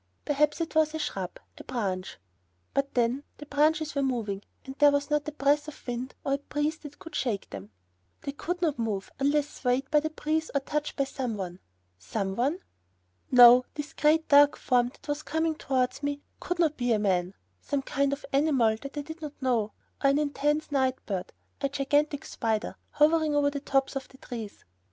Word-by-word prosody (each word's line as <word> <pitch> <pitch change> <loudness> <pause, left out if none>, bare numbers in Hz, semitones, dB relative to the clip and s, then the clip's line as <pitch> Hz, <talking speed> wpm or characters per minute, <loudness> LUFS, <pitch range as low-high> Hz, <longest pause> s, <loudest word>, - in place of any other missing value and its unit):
Perhaps 295 +1 +2
it 330 - -3
was 315 0 +3
a - - 0
shrub, 195 - -4 0.2
a - - -8
branch. 195 -7 -3 0.6
But 275 0 -1
then, 245 +3 +1
the 295 - -9
branches 305 +2 +2
were 280 - 0
moving 225 -7 -1 0.2
and 265 - -6
there 290 -1 +8
was 285 +1 0
not 295 0 +1
a - - -2
breath 290 +1 +2
of 305 - -10
wind 245 +1 -4
or 275 - +1
a - - +2
breeze 295 +2 -2
that 290 -1 -11
could 330 - -11
shake 225 -9 -1
them. 100 +1 -8 0.5
They 280 - -3
could 355 +5 -4
not 300 -7 +1
move 210 -4 -2
unless 285 +1 +2
swayed 260 +1 -1
by 300 - +6
the 315 +1 -2
breeze 315 +1 -1
or 280 - +3
touched 300 +2 -2
by 275 - +1
some 260 -5 -3
one. 180 -2 -5 0.4
Some 190 - -3
one? 280 - 0 0.7
No, 245 0 +9
this 295 0 -5
great, 315 +1 +3
dark 285 0 +6
form 245 -1 +2
that 255 - -19
was 290 0 -1
coming 320 +1 0
towards 260 -4 -1
me 285 0 -3 0.2
could 355 - -3
not 320 -3 +2
be 245 -1 +1
a - - +3
man 190 -3 0 0.3
some 280 -1 -2
kind 280 0 0
of 280 +1 -4
animal 270 -7 +3
that 275 +1 -8
I 290 - -2
did 320 +2 -9
not 300 -2 -7
know, 235 -5 0 0.3
or 275 - +6
an 275 - +3
immense 295 +1 0
night 260 -2 +2
bird, 190 -3 -3 0.3
a 275 - +1
gigantic 290 +1 +1
spider, 220 -2 -2
hovering 305 0 +3
over 285 0 +3
the 285 - -3
tops 270 -1 0
of 270 -1 -4
the 265 - -18
trees. 225 -5 -8
280 Hz, 200 wpm, -28 LUFS, 245-300 Hz, 0.7 s, No